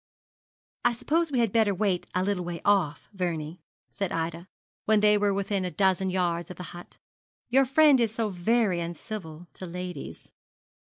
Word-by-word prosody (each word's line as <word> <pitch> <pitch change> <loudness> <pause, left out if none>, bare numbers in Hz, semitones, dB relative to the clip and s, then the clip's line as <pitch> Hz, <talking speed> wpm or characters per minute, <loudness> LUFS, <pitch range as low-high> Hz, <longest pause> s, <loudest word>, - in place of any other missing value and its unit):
'I - - +3
suppose 320 +7 0
we 265 - 0
had 230 -4 +2
better 215 -3 +3
wait 190 -2 0
a 185 - +2
little 195 -2 -1
way 170 -1 -5
off, 195 -8 +2
Vernie,' 170 -3 -3 0.3
said 195 -3 -3
Ida, 165 +2 -3 0.4
when 215 0 +4
they 210 0 +5
were 205 -1 +2
within 200 0 -1
a 180 - -1
dozen 190 0 +1
yards 175 -2 -1
of 180 - -9
the 180 - -6
hut. 175 0 -11 0.5
'Your 265 +2 +4
friend 285 +1 +5
is 230 -3 +2
so 225 -1 -1
very 195 0 +1
uncivil 170 0 -6
to 185 - -8
ladies.' 180 -3 -7
190 Hz, 170 wpm, -27 LUFS, 175-215 Hz, 0.5 s, they